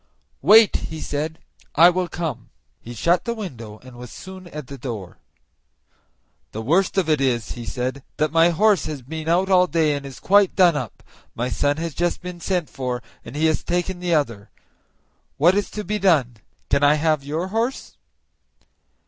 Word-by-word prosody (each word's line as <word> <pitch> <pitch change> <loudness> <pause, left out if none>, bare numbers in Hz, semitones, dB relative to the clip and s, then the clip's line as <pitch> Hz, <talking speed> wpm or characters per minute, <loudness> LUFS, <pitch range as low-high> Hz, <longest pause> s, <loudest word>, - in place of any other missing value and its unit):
"Wait," 220 0 +6
he 160 - -7
said, 155 +2 -3 0.4
"I 170 +4 +7
will 180 0 -1
come." 155 -9 -5 0.3
He 120 +1 -10
shut 170 +9 +1
the 235 - -2
window, 115 - -8
and 130 -1 -13
was 125 -1 -10
soon 185 -1 -10
at 150 -4 -8
the 140 - -9
door. 110 -8 -7 1.3
"The 110 - -4
worst 180 - +1
of 185 -4 +2
it 155 -3 +2
is," 120 -4 0
he 120 -1 -7
said, 130 +2 -3 0.2
"that 155 0 +1
my 165 +1 +5
horse 195 0 +2
has 150 -4 -6
been 160 +4 -5
out 185 +3 +2
all 180 -1 +5
day 160 -3 +1
and 140 - -5
is 135 -2 -9
quite 200 -1 +3
done 180 -4 +5
up; 125 -8 -5 0.3
my 120 +2 -2
son 145 +3 0
has 165 -1 -4
just 175 +3 -1
been 180 -1 -8
sent 175 -2 -1
for, 125 -2 -4 0.2
and 115 - -10
he 155 +2 +1
has 160 -1 +1
taken 175 +1 -2
the 175 -2 +1
other. 115 -9 -2 0.9
What 170 +6 +5
is 205 0 -1
to 210 - -5
be 210 +2 -2
done? 145 - +2 0.3
Can 140 - +3
I 145 +1 +6
have 155 -2 +1
your 160 +6 -3
horse?" 230 +5 -3
160 Hz, 185 wpm, -22 LUFS, 135-180 Hz, 1.3 s, I